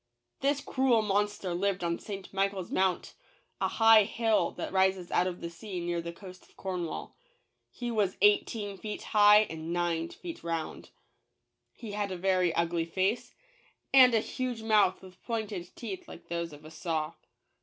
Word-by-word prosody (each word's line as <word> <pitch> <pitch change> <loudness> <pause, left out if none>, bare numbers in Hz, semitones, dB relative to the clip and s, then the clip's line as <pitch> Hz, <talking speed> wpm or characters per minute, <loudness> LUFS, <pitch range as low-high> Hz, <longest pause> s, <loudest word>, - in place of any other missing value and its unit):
This 280 +1 +1
cruel 255 -4 +2
monster 205 -2 0
lived 190 +1 -1
on 170 0 -1
St. 195 -2 -8
Michael's 195 -1 -1
Mount, 185 -1 0 0.5
a - - +1
high 225 -1 +6
hill 225 +1 +1
that - - -5
rises 190 -2 +2
out 180 - +2
of 180 -1 -5
the 170 - -4
sea 185 +1 -6
near 170 0 -2
the 170 0 -5
coast 185 +1 -12
of - - -28
Cornwall. 180 -4 -4 0.5
He 240 -1 -5
was 210 -4 0
eighteen 205 0 +2
feet 210 +2 -5
high 210 0 +6
and 160 -5 -5
nine 170 -1 0
feet 335 - -9
round. 165 -1 -4 0.8
He 225 -3 -9
had 205 -1 -2
a 185 - -3
very 185 -1 +2
ugly 170 0 0
face, 190 +7 -1 0.6
and 255 -3 +8
a 220 - +3
huge 250 -2 -4
mouth 210 -5 +3
with 185 -1 -14
pointed 210 -6 -4
teeth 205 -6 -7
like - - -12
those 170 -1 -3
of 150 +1 -13
a 155 - -10
saw. 160 -2 -2
190 Hz, 165 wpm, -30 LUFS, 175-215 Hz, 0.8 s, and